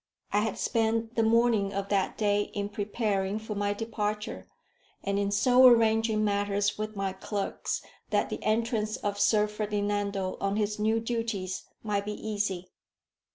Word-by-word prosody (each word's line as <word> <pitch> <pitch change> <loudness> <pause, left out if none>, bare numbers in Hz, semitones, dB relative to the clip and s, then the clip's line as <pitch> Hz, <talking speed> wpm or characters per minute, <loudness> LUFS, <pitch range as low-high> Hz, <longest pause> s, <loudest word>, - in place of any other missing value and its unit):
I 205 - +4
had 215 -1 -1
spent 225 0 0
the 230 - +1
morning 225 -3 +3
of 200 0 -3
that 195 -2 0
day 205 -1 +1
in 200 0 -2
preparing 205 -1 -1
for 220 0 -5
my 205 0 0
departure, 210 -1 -3 0.6
and 200 0 0
in 200 0 0
so 250 +6 +6
arranging 225 -2 +4
matters 205 0 +1
with 215 0 -4
my 195 -1 -2
clerks 195 +1 -3 0.3
that - - +1
the - - -4
entrance 215 -1 0
of 205 0 -3
Sir 210 0 +4
Ferdinando 205 -2 -2
on 195 0 0
his 210 0 -1
new 220 +1 +2
duties 225 -5 -3 0.2
might 205 -2 -1
be 210 - -3
easy. 200 -4 -3
210 Hz, 155 wpm, -29 LUFS, 200-220 Hz, 0.6 s, so